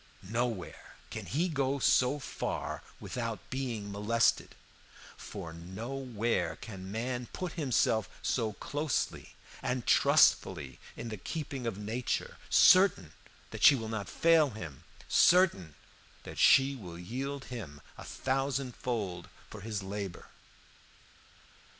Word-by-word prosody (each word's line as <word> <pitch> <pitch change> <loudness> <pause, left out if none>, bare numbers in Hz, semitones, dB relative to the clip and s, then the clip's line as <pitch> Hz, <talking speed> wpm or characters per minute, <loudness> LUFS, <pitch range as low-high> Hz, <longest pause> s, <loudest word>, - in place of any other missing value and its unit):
Nowhere 115 -1 -3 0.2
can - - -6
he 165 +7 +1
go 140 -4 0
so 130 0 +3
far 140 - -4 0.2
without 115 -3 -5
being 120 -6 -3
molested; 105 +3 +1 0.6
for 80 -1 -8
nowhere 110 +2 -3
can 95 -3 -9
man 120 +2 -3
put 180 -2 -4
himself 120 - +1
so 110 -4 0
closely 145 +4 -3 0.3
and 125 -2 -2
trustfully - - +4 0.2
in 115 - -5
the 110 - -5
keeping 135 - -5
of 110 -4 -3
nature, 110 +4 -3
certain 180 - +6 0.4
that - - -7
she 145 - +9
will 115 -4 -4
not 110 -3 -4
fail 165 -3 +4
him, 85 - -9 0.2
certain 170 - +4 0.5
that - - -8
she 135 +1 +6
will 90 -9 -9
yield 135 +9 -5
him 80 -12 -7 0.2
a - - -10
thousand 135 -1 -2
fold 100 -8 -3 0.2
for 105 - -8
his 105 -1 -4
labor. 100 -2 -6
115 Hz, 120 wpm, -31 LUFS, 100-135 Hz, 0.6 s, she